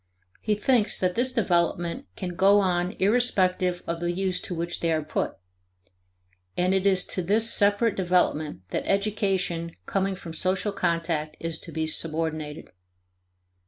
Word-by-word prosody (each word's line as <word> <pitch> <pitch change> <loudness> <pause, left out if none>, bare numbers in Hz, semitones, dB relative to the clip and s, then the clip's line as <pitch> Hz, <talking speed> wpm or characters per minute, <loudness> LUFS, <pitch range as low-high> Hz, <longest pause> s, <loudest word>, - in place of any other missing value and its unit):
He 215 -1 0
thinks 220 +1 +2
that 180 -1 +1
this 250 +4 +1
development 175 - 0
can 185 - -4
go 195 +3 +5
on 180 -1 0
irrespective 185 -5 +1
of 170 0 -3
the 175 0 -1
use 185 0 -1
to 180 - -5
which 170 +1 -3
they 165 - 0
are 155 -1 0
put. 150 - -3 1.2
And 180 +1 +2
it 190 0 +2
is 190 -2 +4
to 185 - -2
this 215 +6 +4
separate 205 +1 +3
development 175 - 0
that - - -3
education 195 -5 -1
coming 195 0 -1
from 170 -3 -9
social 185 +4 0
contact 165 -4 -1
is 165 -1 -3
to - - -7
be 160 0 -2
subordinated. 155 -1 -2
180 Hz, 150 wpm, -26 LUFS, 170-200 Hz, 1.2 s, go